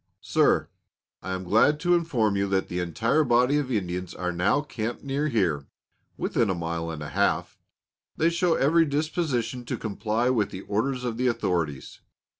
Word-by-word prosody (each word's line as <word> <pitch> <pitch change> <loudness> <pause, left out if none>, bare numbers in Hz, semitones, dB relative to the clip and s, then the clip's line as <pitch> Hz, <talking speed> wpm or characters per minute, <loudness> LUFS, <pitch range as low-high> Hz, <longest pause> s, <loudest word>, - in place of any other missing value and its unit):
Sir: - - +3 0.5
I 95 +2 -4
am 95 0 -4
glad 115 +11 +3
to 175 0 +3
inform 130 -12 +1
you 100 0 0
that 95 -1 0
the 90 - -2
entire 115 - +1
body 125 +2 +3
of 135 -3 -3
Indians 90 -4 -2
are 90 0 -2
now 90 +12 +2
camped 120 -5 -5
near 140 +2 -1
here 90 - 0 0.5
(within - - 0
a 95 - +1
mile 85 -1 -3
and 80 -2 -5
a 75 - -6
half). - - 0 0.6
They 165 +2 +3
show 170 0 +2
every 165 +4 +4
disposition 145 -5 -1
to - - -3
comply 110 +3 -1
with 110 -6 +1
the 95 - -7
orders 125 +6 -1
of 120 -2 -3
the 125 +1 +1
authorities. 85 - -2
115 Hz, 175 wpm, -26 LUFS, 90-140 Hz, 0.6 s, every